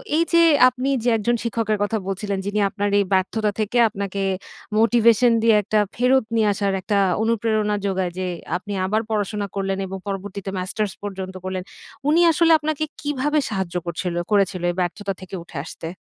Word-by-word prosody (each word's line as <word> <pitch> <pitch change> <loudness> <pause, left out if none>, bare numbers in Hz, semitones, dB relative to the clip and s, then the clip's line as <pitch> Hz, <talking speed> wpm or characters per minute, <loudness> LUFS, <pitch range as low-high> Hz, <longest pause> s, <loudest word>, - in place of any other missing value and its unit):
এই 330 - +4
যে 335 - +6 0.3
আপনি 255 +2 -3
যে 245 - +3
একজন 235 +3 +1
শিক্ষকের 225 -2 -1
কথা 205 +2 0
বলছিলেন, 195 +1 -2
যিনি 205 +1 -1
আপনার 205 +1 -2
এই 200 - +2
ব্যর্থতা 205 +3 +1
থেকে 215 +3 0
আপনাকে 200 -1 -4 0.6
মোটিভেশন 235 +1 +4
দিয়ে, 225 -2 +5
একটা 215 +2 +1 0.2
ফেরত 255 +1 +3
নিয়ে 220 -2 +3
আসার 200 -1 -1
একটা 205 +2 0 0.3
অনুপ্রেরণা 220 -2 +1
যোগায়, 185 -2 -1
যে 185 - -2 0.3
আপনি 205 +2 -7
আবার 215 +3 +1
পড়াশোনা 210 -1 -1
করলেন 195 -1 -1
এবং 195 - -5
পরবর্তীতে 195 0 -5
মাস্টার্স 200 +1 -2
পর্যন্ত 190 -2 -5
করলেন। 185 -1 -3 0.5
উনি 325 +3 +4
আসলে 330 0 +3
আপনাকে 310 0 -2 0.2
কীভাবে 295 +1 0
সাহায্য 190 -4 -3
করছিল 170 +1 -3 0.2
করেছিল 195 -3 +2
এই - - -9
ব্যর্থতা 195 +3 -2
থেকে 185 0 -8
উঠে 170 - -11
আসতে? 165 - -8
205 Hz, 170 wpm, -22 LUFS, 195-230 Hz, 0.6 s, যে